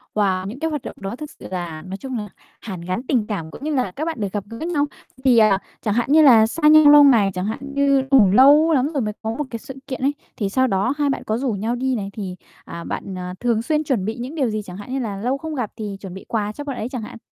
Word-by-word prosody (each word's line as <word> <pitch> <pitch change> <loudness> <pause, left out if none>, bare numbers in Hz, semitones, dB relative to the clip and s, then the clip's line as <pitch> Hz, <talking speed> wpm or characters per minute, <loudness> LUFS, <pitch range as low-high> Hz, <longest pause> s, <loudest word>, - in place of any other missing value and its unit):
Và 190 -3 +1
những 230 +7 -7
cái 320 - -1
hoạt 300 -3 -3
động - - -8
đó 195 +2 -5
thực 300 +3 -8
sự - - -9
là 170 -4 -4
nói 190 +3 -7
chung 260 +2 -5
là 210 -2 -4 0.3
hàn 190 -6 -7
gắn 185 +7 -3
tình 235 -6 +1
cảm 165 -7 -4
cũng - - -11
như 305 0 -1
là 250 -8 0
các 300 +11 -4
bạn 325 -6 -3
được 200 -3 -2
gặp 205 -2 -2
gỡ 230 - -8
nhau. 315 0 0 0.4
Thì, 255 -3 +5
à, 215 -3 +5 0.2
chẳng 210 - 0
hạn 240 +4 0
như 315 +1 +7
là 235 -7 +7
xa 300 +6 +1
nhau 305 -1 +8
lâu 295 0 +9
ngày, 225 -8 +5
chẳng 180 +1 -3
hạn 220 - -3
như 280 -1 +3
cũng 225 -9 +6
lâu 285 +8 +6
lắm 270 -2 +2
rồi 275 - 0
mới 210 -1 -2
có 220 - -3
một 295 - -3
cái 230 - -5
sự 265 - -9
kiện 260 -2 -5
ấy, 280 +2 +2 0.2
thì 205 -5 -1
sau 260 +5 +2
đó 200 +5 +1
hai 290 -1 +1
bạn 270 - -2
có 215 - -1
rủ 255 -1 -1
nhau 220 +4 -2
đi 260 +1 -1
này, 200 -3 -4
thì, 190 -4 -5 0.3
à, 170 - -7
bạn 190 - -5 0.2
thường 235 -2 +1
xuyên 305 +4 0
chuẩn 255 -10 -1
bị 220 +2 -2
những 255 +6 -6
điều 270 -6 +1
gì? 215 -1 -2
Chẳng 185 -2 -10
hạn 250 +5 -8
như 270 - -1
là 215 -6 -3
lâu 250 +7 -1
không 315 +1 -6
gặp 245 -6 -3
thì 210 -3 -5
chuẩn 190 -3 -8
bị 190 - -10
quà 210 -2 -1
cho 290 - -7
bạn 275 -3 -5
ấy 225 - -4
chẳng 255 -3 -5
hạn. 215 - -9
235 Hz, 295 wpm, -21 LUFS, 205-275 Hz, 0.4 s, lâu